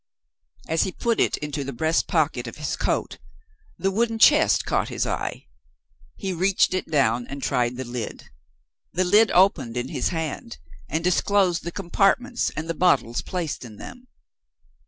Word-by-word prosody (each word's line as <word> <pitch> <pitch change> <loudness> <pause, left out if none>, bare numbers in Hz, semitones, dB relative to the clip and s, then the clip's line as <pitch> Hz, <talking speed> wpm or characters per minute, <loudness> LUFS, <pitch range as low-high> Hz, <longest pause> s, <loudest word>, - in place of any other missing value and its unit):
As 160 0 +1
he 190 - 0
put 230 +4 -1
it - - +2
into 150 -1 -4
the 140 - -5
breast 160 +6 0
pocket 145 -7 0
of 115 - -8
his 150 -1 -3
coat, - - -2 0.6
the 195 - 0
wooden 225 +3 0
chest 220 - +5
caught - - 0
his - - -2
eye. - - -4 0.7
He 190 -1 -4
reached 185 +2 +2
it 185 - -2
down 125 -6 +1
and 140 0 -7
tried 125 0 0
the 130 - -3
lid. 120 -2 -6 0.7
The 185 - +1
lid 210 +5 +5
opened 150 -11 +3
in 125 +1 -3
his - - -1
hand, 160 - -4 0.3
and 160 +3 -1
disclosed 180 0 +2
the 170 - -4
compartments 200 +7 +1
and 155 +1 -3
the 165 - -1
bottles 140 -9 +2
placed 175 -8 -4
in 110 -4 -11
them. 250 0 -11
165 Hz, 165 wpm, -24 LUFS, 130-190 Hz, 0.7 s, chest